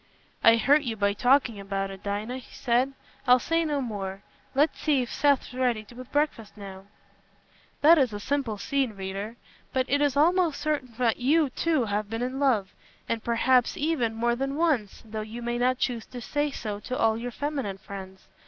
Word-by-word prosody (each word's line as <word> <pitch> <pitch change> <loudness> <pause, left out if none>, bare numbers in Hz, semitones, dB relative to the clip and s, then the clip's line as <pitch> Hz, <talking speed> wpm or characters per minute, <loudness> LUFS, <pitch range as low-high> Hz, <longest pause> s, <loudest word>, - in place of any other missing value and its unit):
"I 230 - +8
hurt 285 +6 +4
you 240 -5 -3
by 200 -1 +1
talking 245 -1 +3
about 195 0 -3
it, 195 0 -10
Dinah," 210 +5 -3
he 255 - -16
said. 250 +3 +1 0.3
"I'll 250 0 +8
say 330 +6 0
no 295 -3 -1
more. 200 -4 -5 0.3
Let's 295 +4 +2
see 285 -5 +2
if 240 - -7
Seth's 285 -3 +2
ready 245 -4 0
with 255 0 -10
breakfast 290 -8 -1
now." 195 -1 -9 1.0
That 320 +2 +7
is 260 -4 +2
a 205 - -5
simple 260 -2 -1
scene, 270 +1 -1
reader. 195 +3 -5 0.4
But 260 -1 +1
it 285 +1 +1
is 285 -1 +2
almost 340 +1 +3
certain 290 -4 -2
that 240 -3 +2
you, 290 +2 +2
too, 310 -3 +1
have 205 0 -2
been 225 +2 -2
in 255 +2 -3
love—perhaps, 235 0 0
even, 285 -8 0
more 235 +1 +1
than 270 +2 -2
once, 290 - 0
though 220 0 -5
you 225 +3 -7
may 240 0 -2
not 255 +1 +2
choose 240 -3 -2
to 250 - -8
say 290 +5 -1
so 210 -7 -5
to 255 +4 -4
all 225 -1 +3
your 235 +2 -4
feminine 270 -7 -3
friends. 190 -1 -10
245 Hz, 185 wpm, -27 LUFS, 215-280 Hz, 1.0 s, I